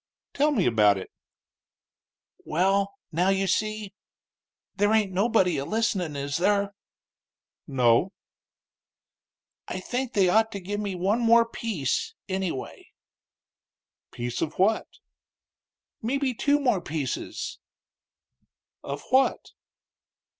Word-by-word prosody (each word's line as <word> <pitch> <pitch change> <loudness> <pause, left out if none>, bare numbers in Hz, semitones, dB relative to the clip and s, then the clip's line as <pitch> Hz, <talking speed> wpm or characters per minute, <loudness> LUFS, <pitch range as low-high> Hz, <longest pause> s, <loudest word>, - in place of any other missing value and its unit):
"Tell 290 +2 +3
me 235 - +1
about 105 -4 +4
it." 95 - -8 1.3
"Well, 195 +4 +1 0.2
now, 175 +4 +2
you 195 0 +2
see 215 +1 -1 0.8
there 205 +1 +2
ain't 215 -3 +2
nobody 190 -5 +2
a - - -2
listenin', 190 -4 -1
is 140 +1 -2
there?" 200 +2 +1 0.9
"No." 125 +5 +3 1.6
"I - - -4
think 250 +6 -3
they 195 -3 +4
ought 220 +4 +3
to 200 - -4
give 205 +3 -4
me 200 -3 -3
one 195 +6 +1
more 230 0 +5
piece, 230 - -2
any 190 -2 -1
way." 130 - -8 1.2
"Piece 120 0 -4
of 160 -1 -3
what?" 210 +4 +2 1.1
"Mebbe 260 +2 -1
two 290 +5 +2
more 245 -10 +1
pieces." 150 -5 -4 1.2
"Of 140 +1 -6
what?" 265 +1 +2
195 Hz, 110 wpm, -26 LUFS, 165-225 Hz, 1.6 s, more